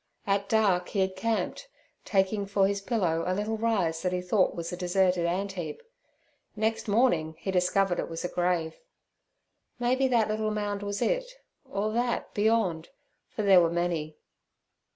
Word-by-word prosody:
At 200 0 0
dark 195 -5 +2
he 195 - 0
had 190 0 0
camped, 230 - -2 0.4
taking 200 0 +1
for 200 -1 +2
his 200 0 -2
pillow 180 -7 0
a 185 - +1
little 210 +3 -1
rise 190 -8 0
that 180 - 0
he 180 - -1
thought 185 +2 +1
was 170 0 -5
a - - -1
deserted 180 -1 +1
antheap; 180 -3 -3 0.7
next 220 +1 -1
morning 200 -8 +2
he 190 +4 -3
discovered 185 0 +2
it - - -3
was 165 +1 -5
a - - +1
grave. 175 -2 -1 1.0
Maybe 255 +2 +2
that 235 -4 +2
little 215 0 -1
mound 205 -1 -2
was 205 0 -2
it—or - - -3
that 240 +1 -1
beyond, 205 -7 +1 0.4
for 215 - -4
there 190 -3 +7
were 170 - +3
many. 170 -3 -2
195 Hz, 155 wpm, -28 LUFS, 180-215 Hz, 1.0 s, there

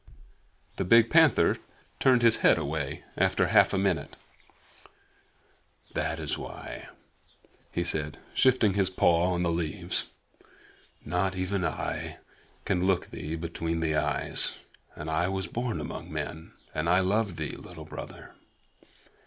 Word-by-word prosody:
The - - 0
big 115 +4 +5
panther 160 -4 +5 0.4
turned 125 -2 +4
his 115 -1 +6
head - - +5
away 75 -1 -3
in - - +4 0.2
half - - +5
a - - 0
minute. 95 -3 -1 1.8
"That 80 +1 -1
is 80 -2 -3
why," - - -8 0.8
he 85 - -1
said, 75 -2 -1 0.2
shifting 125 -6 +4
his 100 -1 +2
paw 90 -1 +3
on 90 0 0
the 85 - +1
leaves. 85 -2 -2 1.0
"Not 95 +2 0
even 95 +1 -1
I - - -3 0.5
can 90 +1 +1
look 95 -2 +1
thee 80 +2 -5
between 85 0 -3
the 80 -1 0
eyes, 75 - +1 0.4
and 75 - -7
I 80 +3 +1
was 95 0 -2
born 115 +1 -3
among 75 - -6
men, 80 +1 -5 0.2
and 80 +2 -1
I 90 +2 +5
love 100 0 +1
thee, 75 -2 -4
Little - - -11
Brother. - - -9
90 Hz, 135 wpm, -28 LUFS, 80-100 Hz, 1.8 s, his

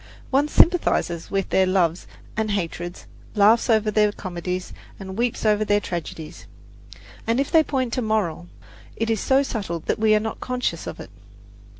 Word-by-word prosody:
One 280 +2 +3
sympathizes 300 - +2
with 195 -1 -1
their 190 0 +3
loves 180 -3 +1 0.3
and 220 0 -1
hatreds, 175 -3 -3 0.3
laughs 215 +4 +4
over 220 -1 +3
their 210 0 +3
comedies, 180 -2 -5 0.3
and 190 -1 -7
weeps 235 0 -1
over 215 0 +3
their 205 -1 +2
tragedies. 165 -4 -6 0.8
And 230 +3 +2
if 275 - -1
they 320 - +6
point 260 -4 -1
a - - 0
moral, 210 -6 -1 0.5
it 225 0 -1
is 220 - 0
so 270 +5 +3
subtle 200 -10 -3
that - - -2
we 215 0 +4
are - - +4
not 220 +1 -4
conscious 250 -10 -2
of - - -6
it. - - -10
210 Hz, 170 wpm, -23 LUFS, 185-230 Hz, 0.8 s, they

